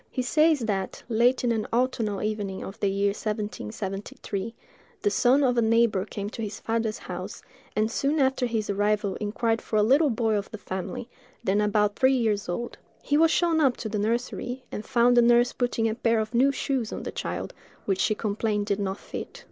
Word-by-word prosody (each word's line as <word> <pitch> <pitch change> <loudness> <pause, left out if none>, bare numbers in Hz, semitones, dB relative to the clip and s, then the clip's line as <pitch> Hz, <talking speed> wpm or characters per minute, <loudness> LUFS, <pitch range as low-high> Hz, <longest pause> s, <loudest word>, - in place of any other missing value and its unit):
He 255 - -2
says 305 +3 +3
that, 195 -4 -2
late 240 +3 +3
in 240 - +2
an 220 -2 -1
autumnal 230 -4 0
evening 205 -3 -3
of 195 - -8
the 200 - +1
year 200 +1 +1
1773, 205 - -4 0.5
the 205 - +3
son 250 +7 +4
of 245 -2 +3
a - - +4
neighbor 225 -3 +3
came 205 -1 -5
to 230 - -6
his 210 -1 -5
father's 225 -1 -1
house, - - -7 0.3
and 215 +1 +1
soon 280 +6 0
after 265 -2 +2
his 225 -3 -2
arrival 205 0 +1
inquired 225 +2 -1
for - - -5
a 210 - +5
little 280 +7 +4
boy 225 -2 +1
of 205 -2 -1
the 215 - -7
family, 190 +3 -5 0.4
then 200 +2 +2
about 210 0 +2
three 265 0 +4
years 210 -5 0
old. 235 +7 -4 0.2
He 290 - +1
was 325 +2 +5
shown 330 -1 +2
up 265 -4 +3
to 220 - -4
the 210 0 -2
nursery, 245 +3 -2
and 210 - -5
found 245 0 +3
the 240 - +7
nurse 240 +1 +4
putting 240 -2 0
a 220 - 0
pair 230 -1 +1
of 220 +2 -3
new 260 +4 +4
shoes 260 -4 -2
on - - -5
the - - -4
child, - - -4 0.3
which 195 -2 0
she 215 +2 +2
complained 210 0 -1
did 200 0 -1
not 195 -1 -2
fit. - - -8
225 Hz, 205 wpm, -26 LUFS, 205-245 Hz, 0.5 s, the